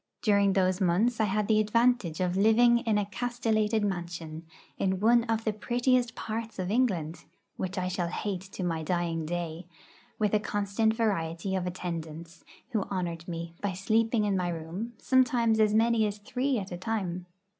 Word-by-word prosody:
During 200 -2 +4
those 185 0 +1
months 205 +7 +2
I 220 - +4
had 210 +1 0
the 215 -1 +4
advantage 215 -5 +2
of 180 0 0
living 235 +4 +5
in 225 -4 +1
a 205 - +1
castellated 220 0 0
mansion, 170 -4 -5 0.3
in 190 -1 0
one 230 +3 +4
of 225 -1 -1
the 215 - 0
prettiest 245 +2 +1
parts 225 +1 -5
of 185 0 -2
England, 185 -10 0 0.3
which 190 +1 -4
I 180 0 0
shall 180 -1 -1
hate 185 +1 -3
to 190 - -4
my 165 -2 -1
dying 165 -1 -1
day, 170 0 -4 0.5
with 210 -1 0
a 215 - +4
constant 205 +2 0
variety 190 -5 -1
of 180 -1 -1
attendants, 170 -2 -6 0.3
who 220 -4 +1
honoured 170 -3 -4
me 170 -1 -5
by 200 -2 -1
sleeping 220 +3 +1
in 200 -1 +1
my 180 -1 0
room, 175 +8 -5
sometimes 240 -4 +3
as 215 -1 +4
many 225 -1 +3
as 205 0 -4
three 250 +6 -1
at 195 -3 -5
a 175 - -4
time. 185 -3 -3
200 Hz, 175 wpm, -29 LUFS, 175-225 Hz, 0.5 s, living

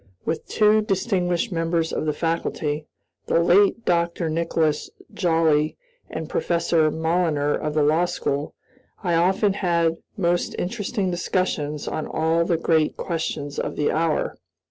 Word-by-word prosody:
With 160 - -3
two 215 0 +4
distinguished 190 -1 0
members 165 -1 0
of 155 - -2
the - - +3
faculty, 155 -2 -2 0.4
the - - +3
late 200 +6 +4
Dr. 170 -1 +1
Nicholas 160 -2 0 0.2
Joly 160 -4 +2 0.3
and 160 0 -5
Professor 165 -2 +1
Moliner 160 -2 +1
of 150 0 -3
the 155 - +3
law 155 +4 +3
school, 150 -5 -3 0.5
I 175 -3 +1
often 190 +4 +3
had 170 -4 +1 0.2
most 175 -2 0
interesting 200 0 -2
discussions 170 -4 -1
on 155 - -3
all 165 +1 +1
the 170 -1 +1
great 160 -1 +1
questions 155 -4 -3
of - - -3
the 150 - +1
hour. 160 0 0
165 Hz, 135 wpm, -23 LUFS, 155-180 Hz, 0.5 s, two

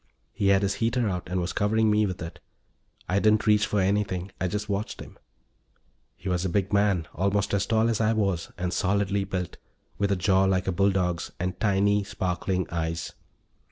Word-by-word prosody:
He 100 - 0
had 100 0 +4
his 100 - +1
heater 115 +1 +1
out 90 -3 -3
and 90 0 -1
was 90 0 -2
covering 110 +1 +2
me 105 0 +3
with 90 -2 -5
it. 85 +1 -8 0.7
I 95 +3 +2
didn't 110 +1 +3
reach 105 -1 +4
for 105 - 0
anything; 95 -1 0
I 95 - +1
just 105 +3 -3
watched 100 +1 -3
him. - - -11 1.0
He - - -10
was 90 -1 0
a 95 - 0
big 95 +2 -1
man, 100 -5 +2
almost 100 +2 0
as 100 -1 +1
tall 110 0 +2
as 115 -2 0
I 110 0 +3
was 100 -6 -1
and 90 0 -2
solidly 100 +1 +1
built, 95 -2 -4 0.4
with 100 0 +1
a - - +3
jaw 95 +1 +3
like 95 -1 +1
a 95 - 0
bulldog's 90 -2 0
and 90 0 -3
tiny, 100 0 +2
sparkling 95 -1 -2
eyes. 80 -1 -3
100 Hz, 195 wpm, -26 LUFS, 90-105 Hz, 1.0 s, had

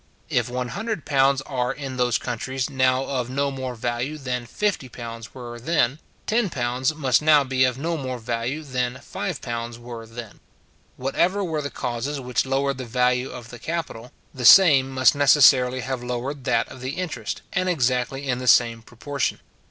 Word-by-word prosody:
If - - +1
£100 135 - 0
are 125 -2 -1
in 135 -2 -6
those 125 -2 +2
countries 130 +3 -3
now 130 0 +2
of 125 -3 -2
no 140 +2 0
more 130 -2 -5
value 120 +6 -3
than 125 -4 -4
£50 120 - -4
were 120 -2 -8
then, 140 0 +1 0.3
£10 130 - 0
must 135 -5 +2
now 150 -2 +5
be 130 -1 +1
of 125 -1 -1
no 165 +4 -2
more 130 -3 -4
value 120 +5 -3
than 125 -3 -2
£5 120 -2 -5
were 120 -1 -9
then. 115 -1 -9 0.6
Whatever 175 +10 +1
were 160 -4 -2
the 145 - -4
causes 125 +4 -3
which 125 -1 -1
lowered 135 0 0
the 130 - -4
value 125 +1 +1
of 125 -1 -9
the 120 - -10
capital, 150 -7 -5 0.2
the 130 - -6
same 135 -1 +8
must 130 -1 +4
necessarily 130 -3 +5
have 130 0 -3
lowered 125 +2 -4
that 115 0 +2
of 130 - -11
the 130 +2 -4
interest, 180 -3 -4
and 185 0 +1
exactly 130 -2 0
in 125 -1 0
the 125 - -5
same 115 -2 +4
proportion. 130 +5 -3
130 Hz, 165 wpm, -23 LUFS, 120-140 Hz, 0.6 s, same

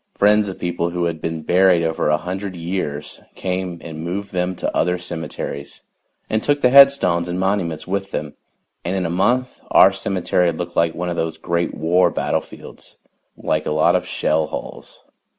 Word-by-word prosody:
Friends 105 0 +3
of 95 - -7
people 85 -1 -2
who 90 0 -2
had 85 -2 -2
been 80 -1 -4
buried 90 -1 +4
over 80 -2 0
a 75 - +3
hundred 95 +3 -5
years 85 -4 -4
came 90 -1 -3
and 80 -1 -7
moved 100 +4 -4
them 90 0 -1
to - - -3
other 90 +2 +1
cemeteries 80 -5 -6 0.5
and 110 - 0
took 145 +3 +1
the 125 - +4
headstones 135 -11 +6
and 90 +1 -3
monuments 95 -5 -1
with 95 +1 -2
them, 75 -5 -4 0.5
and 90 +3 -2
in 95 -2 -1
a 85 - -2
month 120 +8 0
our - - +7
cemetery 90 -2 0
looked 85 +1 -6
like 85 -1 +2
one 90 0 -3
of 85 - -3
those 80 -1 -2
Great 85 +1 -2
War 90 +3 +3
battlefields - - -5 0.4
like - - -1
a - - -1
lot 75 0 +3
of - - -1
shell 80 0 0
holes. - - -8
90 Hz, 180 wpm, -20 LUFS, 80-95 Hz, 0.5 s, our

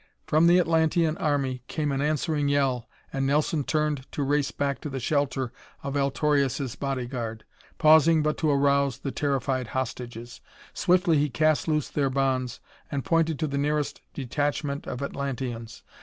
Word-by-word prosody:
From 155 +2 +4
the 175 +1 +6
Atlantean 165 -1 +2
army 135 -4 0
came 150 -2 -1
an 135 0 -1
answering 150 0 0
yell 135 -4 +1 0.2
and 135 0 0
Nelson 150 +1 +1
turned 150 -2 -1
to 145 - -1
race 145 0 +1
back 140 -1 -2
to 150 - -5
the 135 -1 -4
shelter 135 -1 -1 0.3
of 140 0 -3
Altorius' 140 -2 +1
body 135 -3 -2
guard, 115 -3 -5 0.3
pausing 155 0 +6
but 150 0 +1
to 155 - +1
arouse 140 -2 +2
the 135 - -4
terrified 135 -3 -1
hostages. 120 -2 -5 0.3
Swiftly 175 -3 +3
he 150 +1 +1
cast 155 +6 +2
loose 150 -2 +1
their 140 -2 0
bonds 130 -2 0 0.3
and 140 -2 -2
pointed 165 -2 +2
to 155 - -1
the 140 -2 -2
nearest 150 0 -1
detachment 145 +1 -2
of 125 +2 -4
Atlanteans. 130 -5 -4
140 Hz, 155 wpm, -26 LUFS, 130-150 Hz, 0.3 s, the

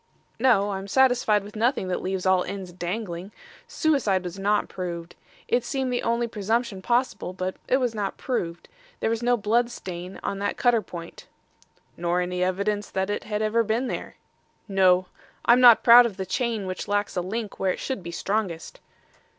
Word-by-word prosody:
"No. 225 -5 +3
I'm 195 0 -5
satisfied 245 -3 +3
with 205 +1 -11
nothing 225 -3 +1
that 180 - -1
leaves 190 0 -3
all 185 -1 +4
ends 190 -3 -6
dangling. 180 +1 -5 0.4
Suicide 275 - +1
was 180 +2 -6
not 205 +1 +1
proved. 170 -2 -6 0.3
It 240 0 +1
seemed 260 0 -2
the 245 - 0
only 235 +1 0
presumption 220 -1 -1
possible, 240 -3 0
but 185 0 -3
it 260 - +3
was 250 -3 0
not 205 -3 -3
proved. 170 -10 -3 0.3
There 225 - 0
was 230 0 -1
no 245 0 +2
blood 235 +3 +1
stain 180 -4 -7
on 195 - -3
that 205 0 -2
cutter 240 -3 +3
point." 170 -4 -10 0.7
"Nor 175 +1 0
any 180 0 -1
evidence 200 +3 -1
that 190 +1 -1
it 205 - -3
had 210 0 -2
ever 220 +2 +2
been 225 +4 0
there." - - -5 0.5
"No. 185 -2 +4 0.4
I'm 240 +2 +6
not 240 -2 +8
proud 240 0 +9
of 205 -4 -9
the 190 - -3
chain 225 +1 -1
which 185 0 -5
lacks 205 0 -1
a 180 - 0
link 210 +4 -5
where 190 -1 +1
it - - -5
should 260 -7 -3
be 170 - -7
strongest." 185 -1 -3
205 Hz, 185 wpm, -25 LUFS, 185-235 Hz, 0.7 s, proud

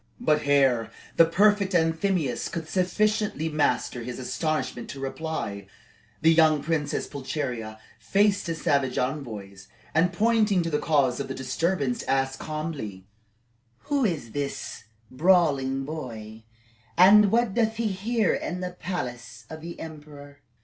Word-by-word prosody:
But 150 -11 +1
ere 130 -6 +3 0.3
the 165 - +7
prefect 200 +2 +3
Anthemius 165 -3 +1
could 165 -2 -5
sufficiently 195 -2 0
master 145 -5 0
his 120 +1 -6
astonishment 155 +4 -2
to 140 - -7
reply, 135 -8 -4 0.6
the 165 +1 +6
young 155 -3 +4
Princess 155 -3 -1
Pulcheria 130 -6 -4 0.2
faced 200 -1 +2
the 165 - -1
savage 140 -4 0
envoys, 110 -8 -4 0.3
and 165 +3 +3
pointing 210 -1 +2
to 165 - -3
the 150 - +1
cause 140 -6 +2
of - - -3
the 135 - -5
disturbance, 135 0 -1
asked 135 0 0
calmly: 155 -12 -5 0.9
"Who 285 -2 +2
is 155 - -1
this 140 +1 -5 0.3
brawling 135 -4 +2
boy, 115 -7 -7 0.5
and 200 +3 +7
what 235 -3 +2
doth 225 0 +1
he 230 0 -2
here 210 +2 0
in 180 +1 -3
the 180 0 -3
palace 125 -10 -6
of 155 0 -8
the 170 +1 -8
emperor?" 145 -2 -10
155 Hz, 135 wpm, -26 LUFS, 135-180 Hz, 0.9 s, the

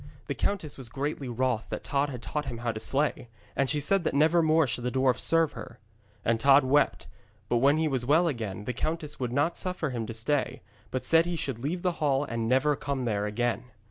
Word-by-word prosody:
The - - -3
countess 165 -9 -2
was 125 -3 -8
greatly 140 +1 -3
wroth 120 -2 -1
that - - -5
Tod 140 +1 0
had 125 -4 -7
taught 150 +4 -3
him 120 - -5
how 120 0 -2
to 110 - -6
slay, 140 0 0 0.3
and 135 -1 +1
she 150 - +1
said 185 +6 +2
that 155 - -1
never 160 +4 +4
more 160 0 +4
should 125 -1 -3
the 125 - 0
dwarf 130 -1 +1
serve 165 -2 +3
her. 115 - -9 0.5
And 115 0 +2
Tod 140 +2 +6
wept, 140 +3 +2 0.4
but 120 - +2
when 140 +5 +4
he 160 0 +1
was 130 -4 -1
well 155 +7 +3
again 110 - -4
the 125 - -2
countess 155 +3 -3
would 125 -2 -2
not 145 +6 +1
suffer 180 -6 -2
him 115 -3 -3
to 115 - -5
stay, 130 -1 -1 0.3
but 130 -1 -3
said 165 +3 +4
he 175 - -2
should 135 -7 -3
leave 160 +8 -3
the 180 - +2
hall 140 -2 +2
and 115 -3 -3
never 145 +3 +3
come 140 -2 -3
there 105 -2 0
again. 120 +3 -1
135 Hz, 230 wpm, -28 LUFS, 120-155 Hz, 0.5 s, Tod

